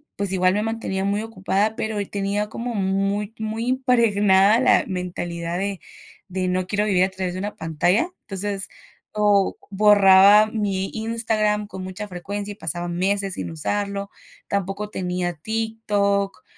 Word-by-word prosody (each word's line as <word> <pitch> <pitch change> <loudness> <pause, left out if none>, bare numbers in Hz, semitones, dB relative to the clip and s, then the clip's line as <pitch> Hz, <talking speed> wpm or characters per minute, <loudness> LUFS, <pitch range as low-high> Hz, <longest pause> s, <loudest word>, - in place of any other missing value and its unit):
pues, 200 -1 -1
igual 185 0 +2
me 210 - 0
mantenía 225 -4 -2
muy 200 +1 0
ocupada, 215 0 -1
pero, 215 -1 -3
eh, 200 - -3
tenía 205 +1 -2
como 235 +2 -4
muy 195 +1 -1
muy 220 +2 -3
impregnada 225 -5 +4
la - - +4
mentalidad 175 -2 -4
de 195 -1 -2 0.5
de 185 0 -2
no 185 0 0
quiero 205 +2 0
vivir 185 -3 +3
a 190 - +2
través 185 -1 -4
de 185 - -4
una 205 +2 -4
pantalla. 175 - +1
Entonces, 195 -1 -3 0.5
o 205 -2 +3
borraba 205 0 +6
mi 200 -3 -2
Instagram 220 -2 0
con 190 - -8
mucha 185 +3 -6
frecuencia, 200 +3 -5
y 205 - -8
pasaba 175 -2 -2
meses 195 +2 0
sin - - -4
usarlo, 200 +5 -3 0.4
tampoco 200 +1 -2
tenía 180 -2 -2
TikTok, 205 +1 -1
200 Hz, 150 wpm, -23 LUFS, 190-210 Hz, 0.5 s, borraba